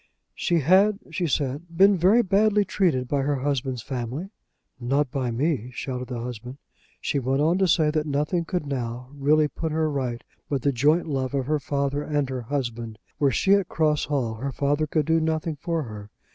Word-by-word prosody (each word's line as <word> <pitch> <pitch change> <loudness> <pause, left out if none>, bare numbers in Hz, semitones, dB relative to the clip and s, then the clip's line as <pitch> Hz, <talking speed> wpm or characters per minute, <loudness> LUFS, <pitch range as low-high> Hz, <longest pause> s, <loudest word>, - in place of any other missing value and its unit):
"She 170 -2 +1
had," 195 +7 +4
she 175 -3 -1
said, 150 +4 -2
"been 195 +2 +6
very 195 +7 +4
badly 205 +1 +3
treated 165 -10 +1
by 140 +1 0
her 145 +1 0
husband's 130 -3 -2
family." 135 - -4 0.5
"Not 135 +2 0
by 130 -3 -1
me," 125 0 -1
shouted 125 -1 -4
the 125 -2 -4
husband. 125 +2 -7 0.4
She 140 - -1
went 135 +1 0
on 165 +5 +2
to 190 - +3
say 155 -2 +3
that 155 0 -1
nothing 150 +5 0
could 180 -2 -2
now 125 -2 -4
really 150 +2 +3
put 160 +2 -4
her 155 0 0
right 125 -4 -3 0.3
but 135 -4 -1
the 140 - +3
joint 150 +7 +2
love 135 -2 -2
of 135 -2 0
her 150 +2 0
father 140 0 -1
and 145 -2 -1
her 130 -1 -3
husband. 120 -3 -4 0.2
Were 140 - +4
she 190 - +3
at 200 -3 +2
Cross 155 -2 +1
Hall 130 -6 -1
her 135 +4 -3
father 145 +3 0
could 150 0 0
do 165 +1 +3
nothing 160 0 -1
for 165 +2 -2
her. 105 -4 -9
145 Hz, 195 wpm, -25 LUFS, 130-160 Hz, 0.5 s, been